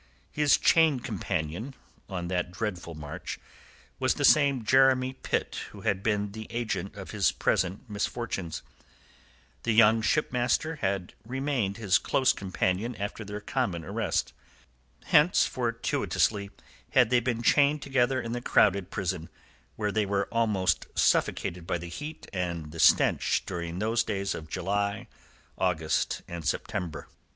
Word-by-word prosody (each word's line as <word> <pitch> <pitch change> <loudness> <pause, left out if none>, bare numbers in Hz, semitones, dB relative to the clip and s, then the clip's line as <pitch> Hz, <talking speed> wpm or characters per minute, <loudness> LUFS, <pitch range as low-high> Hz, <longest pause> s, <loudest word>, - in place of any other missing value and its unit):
His 150 -1 +4
chain 160 -5 +4
companion 105 - -3 0.3
on 90 -3 -4
that 90 0 -1
dreadful 90 -4 -4
march 75 -1 -7 0.6
was - - +2
the - - +1
same 140 -5 +4
Jeremy 130 +1 +4
Pitt - - -2
who - - -12
had 95 -1 0
been 105 -1 0
the 110 +1 -8
agent 110 -3 -3
of 95 -2 -8
his 100 -3 +2
present 95 +7 0
misfortunes. 105 -4 -3 1.0
The 115 - 0
young 110 0 +6
shipmaster 140 +4 +1
had 95 -5 -2
remained 125 -4 -2
his 95 -5 +3
close 130 +6 +2
companion 95 +4 -1
after 105 +2 -5
their 105 0 -6
common 85 -5 -2
arrest. 105 +5 -1 0.7
Hence, 150 +5 +5
fortuitously, 115 -4 0 0.4
had 125 -3 +5
they 125 - +5
been 120 -1 -2
chained 145 +4 +4
together 130 -1 +1
in 115 -1 -4
the 120 +1 -3
crowded 100 -5 +3
prison, 90 -4 -3 0.5
where 105 -1 -1
they 105 -1 0
were 100 0 0
almost 105 -6 +1
suffocated 85 -1 +1
by - - 0
the 85 0 -8
heat 150 - -7
and 85 -4 -3
the 80 - -9
stench - - +4
during 85 0 -4
those 110 +4 +1
days 100 -2 -2
of 80 0 -8
July, 100 +6 -1 0.5
August, 80 -4 0
and 85 -1 -6
September. 80 0 -3
105 Hz, 140 wpm, -28 LUFS, 90-120 Hz, 1.0 s, young